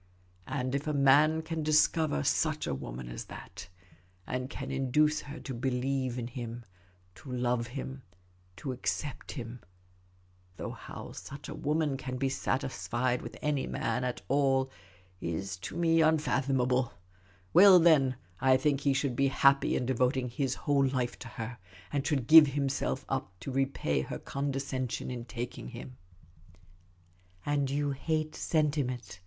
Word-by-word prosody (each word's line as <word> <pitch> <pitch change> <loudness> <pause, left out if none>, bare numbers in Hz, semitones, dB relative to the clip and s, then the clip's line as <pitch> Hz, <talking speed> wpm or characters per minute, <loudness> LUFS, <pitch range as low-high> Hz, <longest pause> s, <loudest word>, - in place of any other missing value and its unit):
And 130 -1 -2
if 140 +2 -2
a 150 - 0
man 150 +3 +5
can 165 0 -3
discover 155 - +3
such - - +1
a - - -1
w^oman 60 -1 -6
as - - -6
that, - - -10 0.6
and 125 +1 -3
can 135 -2 -6
induce 145 +3 +2
her 145 +2 -8
to 135 - -5
be 125 +2 -1
lieve 130 0 -1
in 120 - -3
him, 120 -1 -6 0.5
to 95 +8 -11
love 125 -1 0
him, 135 +1 -6 0.5
to 135 +7 -4
accept 130 +3 -3
him 120 -3 -7 0.5
— 90 0 -33
though - - -4
how - - -9
such 140 +1 -9
a - - -4
woman 150 -2 0
can 130 -1 -5
be 135 +1 0
satisfied 130 -2 -1
with - - -8
any 145 -2 0
man 125 - -1
at 125 -1 -2
all 135 -1 +2 0.5
is 95 +4 -3
to 95 - -7
me 165 -1 +4
unfathomable 135 - +2 0.3
— 90 0 -31
well, 190 +1 +9
then, 155 -7 +5 0.2
I 130 -1 +5
think 140 +1 +1
he 140 -1 +2
should 135 -2 0
be 140 +2 +3
happy 140 +1 +4
in 125 - 0
devoting 130 0 +1
his 135 +1 -1
whole 140 -1 +3
life 130 -2 -2
to 125 - -8
her, 115 +1 -6 0.3
and 140 -2 0
should 140 -7 0
give 155 +2 +10
himself 140 -1 -1
up 130 -10 -3
to 135 - -5
repay 135 - 0
her - - -5
condescension 135 -3 -3
in 120 -2 -5
taking 120 0 -6
him." 125 +1 -9 0.7
" 90 +1 -31
And 145 -1 +1
j'ou 145 +1 0
hate 155 +3 -2
sentiment 140 - -1
130 Hz, 160 wpm, -30 LUFS, 120-145 Hz, 0.7 s, give